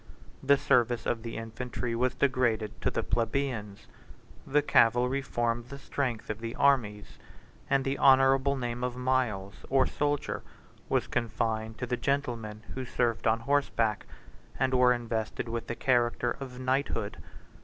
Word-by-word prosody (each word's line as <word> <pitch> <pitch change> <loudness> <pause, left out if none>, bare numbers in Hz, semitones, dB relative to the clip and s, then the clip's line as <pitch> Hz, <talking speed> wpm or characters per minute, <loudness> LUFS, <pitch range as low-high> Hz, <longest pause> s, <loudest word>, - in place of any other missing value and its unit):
The 140 +1 +4
service 120 -3 +2
of 115 - -1
the 115 0 -6
infantry 115 +1 -4
was 125 +2 0
degraded 120 -6 0
to - - +1
the - - -2
plebeians; 115 -4 -2 0.6
the 150 +1 +3
cavalry 125 +1 +3
formed 120 -2 -1
the 140 - -7
strength 130 -6 -3
of 105 - -6
the 115 0 -5
armies, 115 -8 +1 0.5
and 135 -1 +2
the 135 +1 -1
honorable 135 +1 +5
name 120 -2 -3
of 125 -1 -2
miles, 125 -7 -1
or 135 -1 +4
soldier, 145 -1 -1 0.5
was - - +1
confined 110 -1 -2
to 125 - -3
the 125 0 -2
gentlemen 120 -5 -2
55 - - -7
who 130 - -3
served 120 -2 0
on 115 +1 +2
horseback, 115 -5 0 0.5
and 130 0 +1
were 125 -1 +5
invested 115 -2 -2
with 115 0 -4
the 120 - -3
character 120 -1 +1
of 130 -2 -7
knighthood. 130 +2 -1
120 Hz, 150 wpm, -29 LUFS, 115-135 Hz, 0.6 s, honorable